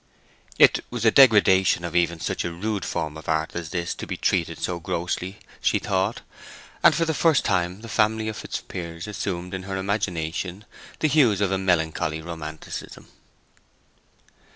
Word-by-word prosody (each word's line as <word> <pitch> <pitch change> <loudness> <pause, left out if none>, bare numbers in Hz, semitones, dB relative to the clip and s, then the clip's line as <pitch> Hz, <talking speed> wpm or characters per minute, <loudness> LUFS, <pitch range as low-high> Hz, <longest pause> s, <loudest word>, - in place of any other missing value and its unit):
It - - +6
was 120 -2 -3
a 110 - +6
degradation 100 -9 +5
of 85 0 -5
even 85 -1 +2
such - - -2
a 85 - -3
rude 100 +3 -3
form 75 0 -3
of 80 - -9
art 80 0 0
as 85 -3 -4
this 85 0 -2
to - - -8
be - - -4
treatad 85 -3 0
so 90 -1 -3
grossly, 90 +3 -3 0.2
she - - +2
thought, 95 +3 -1 0.6
and - - +6
for 165 - +1
the 160 - 0
first 160 -1 +3
time 90 0 0
the 115 - -9
family 110 0 +1
of 110 - -3
Fitzpiers 85 -1 -6
assumed 90 -3 -4
in 95 - -3
her 95 0 -4
imagination 95 -1 -2 0.4
the 155 - +4
hues 130 -9 +4
of 100 -2 +1
a 95 - +1
melancholy 80 -3 0
romanticism. 80 -1 -8
95 Hz, 165 wpm, -24 LUFS, 85-105 Hz, 0.6 s, It